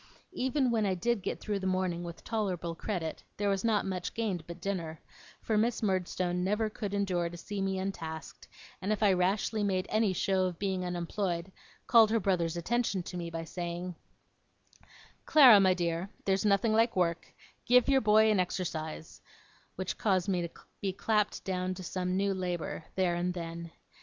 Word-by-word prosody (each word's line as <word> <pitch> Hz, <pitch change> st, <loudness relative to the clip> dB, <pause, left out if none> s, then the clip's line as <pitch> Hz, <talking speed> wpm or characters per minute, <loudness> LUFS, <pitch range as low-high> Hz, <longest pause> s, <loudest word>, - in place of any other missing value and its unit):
Even 260 Hz, 0 st, +1 dB
when 225 Hz, -2 st, +2 dB
I 195 Hz, -2 st, +1 dB
did 235 Hz, +4 st, 0 dB
get -, -, -3 dB
through 205 Hz, -2 st, -2 dB
the 190 Hz, -, -2 dB
morning 185 Hz, -2 st, 0 dB
with 170 Hz, 0 st, -8 dB
tolerable 185 Hz, -7 st, -2 dB
credit, 165 Hz, -2 st, -4 dB
there 205 Hz, 0 st, 0 dB
was 195 Hz, -1 st, -1 dB
not 220 Hz, -3 st, +2 dB
much 185 Hz, -2 st, -4 dB
gained 205 Hz, -7 st, -1 dB
but 170 Hz, -, -8 dB
dinner; 170 Hz, -5 st, -3 dB, 0.4 s
for 215 Hz, -2 st, +1 dB
Miss 230 Hz, +1 st, 0 dB
Murdstone 180 Hz, -2 st, 0 dB
never 210 Hz, +3 st, 0 dB
could 205 Hz, -2 st, -4 dB
endure 180 Hz, -4 st, 0 dB
to 175 Hz, -, -9 dB
see 200 Hz, +3 st, -5 dB
me 195 Hz, 0 st, 0 dB
untasked, 165 Hz, -5 st, -6 dB, 0.3 s
and 195 Hz, +2 st, -1 dB
if 215 Hz, 0 st, 0 dB
I 200 Hz, -2 st, +5 dB
rashly 195 Hz, +4 st, +1 dB
made 185 Hz, -2 st, 0 dB
any 215 Hz, -2 st, +3 dB
show 185 Hz, 0 st, +1 dB
of 180 Hz, -2 st, -3 dB
being 190 Hz, -1 st, -1 dB
unemployed, 175 Hz, 0 st, -2 dB, 0.3 s
called 225 Hz, -3 st, +6 dB
her 230 Hz, +1 st, +2 dB
brother's 175 Hz, -5 st, 0 dB
attention 205 Hz, +1 st, 0 dB
to 180 Hz, -, -8 dB
me 170 Hz, -1 st, -4 dB
by 165 Hz, 0 st, -4 dB
saying, 175 Hz, +2 st, -5 dB, 1.3 s
'Clara, 255 Hz, -9 st, +9 dB
my 190 Hz, -1 st, +4 dB
dear, 170 Hz, +1 st, -2 dB, 0.2 s
there's 195 Hz, +1 st, +1 dB
nothing 210 Hz, +2 st, +3 dB
like 225 Hz, +2 st, +3 dB
work 170 Hz, -2 st, 0 dB, 0.4 s
give 250 Hz, 0 st, +5 dB
your 270 Hz, -1 st, +4 dB
boy 220 Hz, 0 st, +5 dB
an 205 Hz, -, +2 dB
exercise'; 160 Hz, -3 st, -3 dB, 0.5 s
which 185 Hz, -1 st, -4 dB
caused 190 Hz, -3 st, +1 dB
me 185 Hz, -3 st, +1 dB
to 170 Hz, -, -3 dB, 0.3 s
be 195 Hz, -, 0 dB
clapped 210 Hz, +1 st, 0 dB
down 185 Hz, -1 st, -2 dB
to 185 Hz, -, -8 dB
some 180 Hz, +1 st, -2 dB
new 200 Hz, 0 st, +1 dB
labour, 180 Hz, -3 st, -3 dB
there 185 Hz, -2 st, +2 dB
and 175 Hz, +1 st, -1 dB
then. 170 Hz, -1 st, -6 dB
190 Hz, 180 wpm, -31 LUFS, 175-210 Hz, 1.3 s, Clara